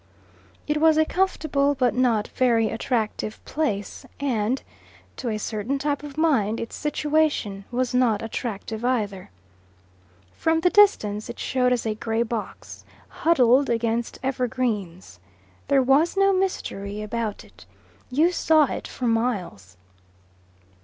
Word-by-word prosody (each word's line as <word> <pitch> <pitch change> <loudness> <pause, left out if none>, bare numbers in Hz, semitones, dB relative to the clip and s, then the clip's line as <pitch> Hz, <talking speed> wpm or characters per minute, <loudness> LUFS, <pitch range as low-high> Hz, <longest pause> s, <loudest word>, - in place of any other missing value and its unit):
It 300 0 0
was 320 -1 +5
a 315 - +4
comfortable 305 -6 0
but 255 -2 +1
not 240 -4 +1
very 230 -4 +2
attractive 220 -2 -2
place, 240 -11 -3 0.2
and, 250 -2 -1 0.5
to 245 - -3
a 215 - -1
certain 215 +5 -3
type 285 0 -1
of 295 -1 -10
mind, 230 -10 +2
its 230 - -6
situation 295 -10 0
was 250 0 -1
not 235 -4 +2
attractive 225 0 -5
either. 210 -7 -1 1.0
From 320 0 +1
the 360 - +3
distance 215 - +3
it - - -7
showed 250 -1 0
as 245 -2 0
a 220 - 0
grey 225 +1 -1
box, 225 -2 -6 0.3
huddled 270 -4 +3
against 230 0 -1
evergreens. 230 - -2 0.5
There 275 -1 +4
was 290 +8 +3
no 390 0 +4
mystery 210 - -2
about 215 -1 -3
it. - - -18 0.4
You 305 +7 +3
saw 315 -4 +3
it - - -5
for 255 - -5
miles. 200 - -2
245 Hz, 130 wpm, -24 LUFS, 215-285 Hz, 1.0 s, was